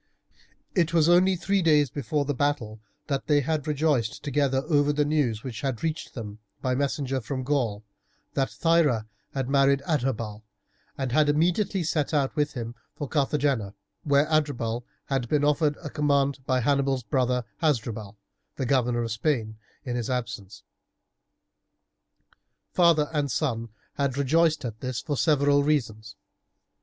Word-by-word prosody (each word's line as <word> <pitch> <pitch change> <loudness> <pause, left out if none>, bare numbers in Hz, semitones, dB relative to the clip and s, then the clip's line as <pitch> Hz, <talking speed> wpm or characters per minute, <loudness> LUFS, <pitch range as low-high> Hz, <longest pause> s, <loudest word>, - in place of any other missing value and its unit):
It 170 -2 +1
was 160 -1 +5
only 180 +2 +5
three 195 +3 0
days 150 -5 +3
before 145 +2 -1
the 145 - -1
battle 125 -6 -1 0.3
that 140 -2 -2
they 145 -1 +4
had 155 +1 -2
rejoiced 145 -6 0
together 140 -2 +1
over 145 -2 +3
the 150 0 +1
news 140 -8 0
which 120 -3 -6
had 130 -5 -3
reached 160 -2 -3
them 105 -3 -7 0.2
by 130 - -1
a - - 0
messenger 135 -1 -1
from 130 +3 -4
Gaul 125 -7 -1 0.5
that 135 -1 0
Thyra 160 -10 +2 0.3
had 135 -2 -1
married 140 0 +3
Adherbal, 115 -8 -1 0.6
and 135 -2 -2
had 150 +3 +3
immediately 175 +5 +1
set 155 -1 0
out 140 -2 +1
with 150 0 0
him 115 -2 -5 0.2
for 145 - -4
Carthagena, 140 -7 0 0.3
where 140 0 +3
Adherbal 140 -7 0 0.2
had 135 -4 -2
been 150 -1 +2
offered 150 0 +2
a 145 - -6
command 140 -2 +1
by 130 -1 +2
Hannibal's 135 0 +1
brother 125 -1 0 0.2
Hasdrubal, 110 -9 -1 0.4
the 130 - -2
governor 120 -2 +1
of 115 - -3
Spain, 110 -2 -1 0.3
in 125 -2 -3
his 120 -1 -2
absence. 105 -5 -4 2.1
Father 170 -4 +4
and 145 -2 0
son 115 -4 -1 0.3
had 140 -2 0
rejoiced 155 +2 +2
at 110 -2 -5
this 130 -1 -3
for 150 -2 -3
several 145 -1 +3
reasons. 110 -8 -1
140 Hz, 150 wpm, -26 LUFS, 120-150 Hz, 2.1 s, was